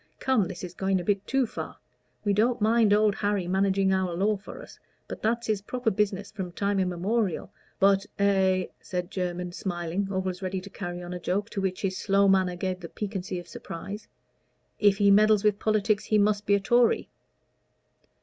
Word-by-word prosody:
Come, 255 -8 +2
this 175 - -8
is 180 -1 -6
going 190 0 0
a - - -4
bit 200 +1 0
too 270 -1 +2
far. - - -7 0.5
We 205 - +3
don't 235 +4 +2
mind 220 0 +3
Old 210 0 +4
Harry 205 -3 -1
managing 190 +1 +2
our 185 -2 0
law 205 +4 +2
for 195 - -10
us - - -13 0.3
that's 230 +2 -2
his 215 -3 0
proper 240 +2 -1
business 205 0 -1
from 190 -5 -6
time 200 +1 0
immemorial; 185 +2 -1 0.3
but 195 0 +4
" - - -45
"But 200 - +2
a 190 -2 +2
" - - -44
said 180 0 -4
Jermyn, 180 -1 -3
smiling, 175 +1 -3
always 190 -1 -2
ready 190 0 -2
to 195 +2 -11
carry 175 -1 -6
on 175 0 -6
a 180 - -5
joke, 200 +5 -2
to 195 - -3
which 190 0 -2
his 190 -1 -1
slow 200 0 +3
manner 190 -2 +3
gave 185 0 -3
the 170 -2 -8
piquancy 195 -3 -4
of 175 -1 -8
surprise, 200 +6 -8 0.7
"if 205 -2 +4
he 200 -1 +5
meddles 210 0 +5
with 210 -1 +2
politics 215 -1 +1
he 215 - +2
must 205 0 +2
be 200 - +5
a - - +2
Tory." 240 +3 +3
195 Hz, 195 wpm, -27 LUFS, 185-210 Hz, 0.7 s, he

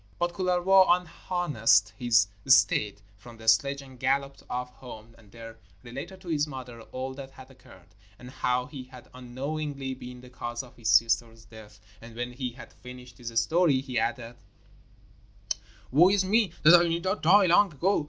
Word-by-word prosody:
But 175 0 -1
Kullervo 185 +1 +3
unharnessed 170 - +1
his 120 -2 +3 0.2
steed 105 -5 +3 0.2
from 115 +2 -14
the 110 0 -13
sledge 140 +5 +2
and 130 -2 -15
galloped 135 +1 -1
off 125 0 -4
home 115 -3 -12
and 105 -3 -21
there 115 0 -11 0.3
related 140 +10 -9
to 180 - -10
his 150 -2 0
mother 125 -4 -9
all 130 +1 -5
that 135 0 -9
had 135 0 -15
occurred, 125 -8 -18 0.3
and 125 +3 -12
how 125 -1 -1
he 135 -2 -9
had 125 -1 -15
unknowingly 135 +2 -5
been 125 -1 -10
the 125 0 -15
cause 120 0 -5
of 125 - -16
his 115 -2 -4
sister's 115 -1 +2
death, 105 -1 -15 0.2
and 115 0 -13
when 120 +1 -4
he 125 -1 -5
had 120 -1 -13
finished 125 0 -13
his 115 -1 -1
story, 165 -5 +2
he 130 -3 -3
added: 120 +1 -3 1.5
'Woe 165 +8 +6
is 195 -1 +2
me 210 -1 +2
that 155 +3 +8
I 175 - +1
did 170 +1 -2
not 190 +3 -2
die 190 +5 +5
long 180 +2 +4
ago. 175 +8 +1
130 Hz, 175 wpm, -27 LUFS, 120-155 Hz, 1.5 s, that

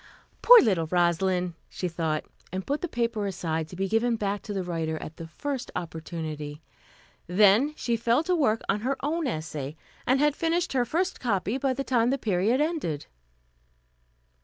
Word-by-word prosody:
"Poor - - +10
little 185 -9 +1
Rosalind," 180 +1 +1 0.2
she 180 - -3
thought, 160 -2 -2 0.3
and 185 +1 -4
put 285 +2 -1
the 350 - -1
paper 230 -6 -1
aside, 165 -4 -2
to 180 - -10
be 195 +2 -1
given 230 +3 +2
back 205 -2 -2
to - - -7
the 195 -2 -2
writer 165 -2 -2
at 155 - -8
the 165 - -7
first 270 - -4
opportunity. 160 -3 -5 0.7
Then 210 - +4
she 235 -5 -1
fell 235 +5 +2
to 360 +2 +1
work 225 -9 +2
on 205 - +1
her 265 +5 -1
own 320 0 0
essay, 155 - -4 0.3
and 260 +2 +4
had 295 0 +3
finished 335 +1 0
her 250 -2 +2
first 360 +9 -1
copy 220 +1 0
by 270 -1 +1
the 275 - -2
time 240 -3 +2
the 270 - +1
period 215 +2 +1
ended. 295 - -1
205 Hz, 175 wpm, -27 LUFS, 170-265 Hz, 0.7 s, Poor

